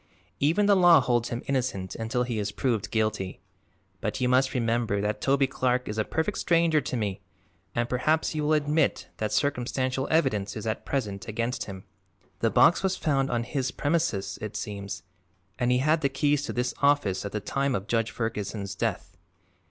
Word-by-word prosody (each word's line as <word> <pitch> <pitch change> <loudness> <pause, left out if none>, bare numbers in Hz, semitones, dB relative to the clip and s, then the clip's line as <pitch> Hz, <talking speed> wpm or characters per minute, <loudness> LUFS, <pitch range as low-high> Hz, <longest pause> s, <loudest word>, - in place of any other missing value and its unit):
Even 165 +9 +3
the 200 0 +5
law 175 -3 +7
holds 120 -2 +1
him 120 +1 -4
innocent 125 -9 -1
until 115 +2 -1
he 120 -3 -2
is 105 0 -2
proved 115 -5 -1
guilty. 110 -4 -1 0.6
But - - -3
you 125 - +1
must 130 +1 +2
remember 115 -3 +1
that 105 +1 -2
Toby 140 0 +3
Clark 125 -1 0
is 105 +1 -3
a - - +3
perfect 160 - -2
stranger 165 -3 +3
to 130 -1 -3
me 105 -4 -2 0.5
and 120 0 +1
perhaps 155 +8 +1
you 155 - -2
will 150 +1 +2
admit 150 0 +1
that 110 -1 -2
circumstantial 130 +2 0
evidence 105 -11 +1
is 110 - -6
at 110 - -3
present 105 -8 -2
against 115 +3 -2
him. 95 -2 -8 0.6
The - - +2
box 170 - +5
was 190 -1 0
found 135 -3 +1
on 120 -1 0
his 130 +1 -2
premises, 150 -10 -1
it 105 -1 -5
seems, 100 -6 -5 0.6
and 120 0 +2
he 125 - +4
had 155 +5 +2
the 140 - +2
keys 145 +1 +1
to - - -4
this 125 +1 -1
office 140 -10 +2
at 100 - -5
the 105 - -2
time 140 +4 -1
of 95 - -3
Judge 115 0 0
Ferguson's 105 -3 -3
death. 95 - -3
125 Hz, 185 wpm, -27 LUFS, 110-145 Hz, 0.6 s, law